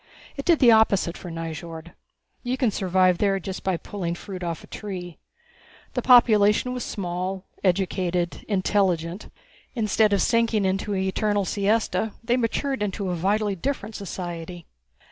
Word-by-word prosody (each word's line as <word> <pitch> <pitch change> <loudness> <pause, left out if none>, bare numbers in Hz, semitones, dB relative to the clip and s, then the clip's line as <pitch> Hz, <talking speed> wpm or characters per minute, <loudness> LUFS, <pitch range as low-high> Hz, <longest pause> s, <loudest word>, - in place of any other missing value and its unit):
It 275 - -6
did 340 -2 +5
the 245 -5 +6
opposite 200 -5 +3
for 180 - -8
Nyjord. 165 0 -6 0.5
You 250 +1 -2
can 250 -4 +2
survive 185 -2 +2
there 195 -2 +2
just 190 +1 -6
by 190 -2 0
pulling 175 -2 -4
fruit 185 +1 -8
off 170 -2 -4
a - - -11
tree. 180 -5 -7 0.7
The 250 - -1
population 230 -1 +5
was 250 - -3
small, 185 0 -4 0.2
educated, 180 -2 0
intelligent. 185 -3 0 0.5
Instead 215 -2 +2
of 200 -3 +3
sinking 230 -3 +2
into 195 +2 -1
an 190 - 0
eternal 205 +1 0
siesta 215 +2 0
they 240 +1 +2
matured 255 +1 -1
into 200 -2 -2
a - - -1
vitally 200 +4 0
different 220 +1 -3
society. 175 -4 -6
195 Hz, 145 wpm, -24 LUFS, 180-220 Hz, 0.7 s, the